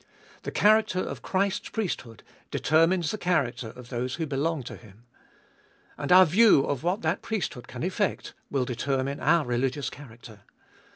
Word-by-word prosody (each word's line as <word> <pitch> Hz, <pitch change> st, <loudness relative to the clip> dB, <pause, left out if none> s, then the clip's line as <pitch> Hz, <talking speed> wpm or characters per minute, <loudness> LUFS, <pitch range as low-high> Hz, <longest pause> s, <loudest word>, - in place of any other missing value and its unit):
The -, -, -5 dB
character 215 Hz, -2 st, +3 dB
of -, -, -4 dB
Christ's 195 Hz, 0 st, -1 dB
priesthood 165 Hz, -, -4 dB, 0.3 s
determines 165 Hz, +2 st, +2 dB
the 215 Hz, -, -5 dB
character 135 Hz, -, 0 dB
of 125 Hz, +1 st, -12 dB
those 125 Hz, +1 st, -3 dB
who 160 Hz, -, -3 dB
belong 150 Hz, +1 st, -1 dB
to -, -, -8 dB
Him. 110 Hz, +1 st, -17 dB, 0.9 s
And 145 Hz, +2 st, -4 dB
our 185 Hz, +1 st, +9 dB
view 195 Hz, -1 st, +5 dB
of 140 Hz, -3 st, -2 dB
what 180 Hz, +3 st, -1 dB
that 160 Hz, +4 st, 0 dB
priesthood 165 Hz, -, -4 dB
can 125 Hz, -, -7 dB
effect 190 Hz, +3 st, -2 dB, 0.2 s
will 135 Hz, -3 st, 0 dB
determine 135 Hz, +3 st, -2 dB
our 165 Hz, -1 st, +3 dB
religious 125 Hz, +3 st, -1 dB
character. 120 Hz, -5 st, -13 dB
145 Hz, 155 wpm, -27 LUFS, 125-180 Hz, 0.9 s, our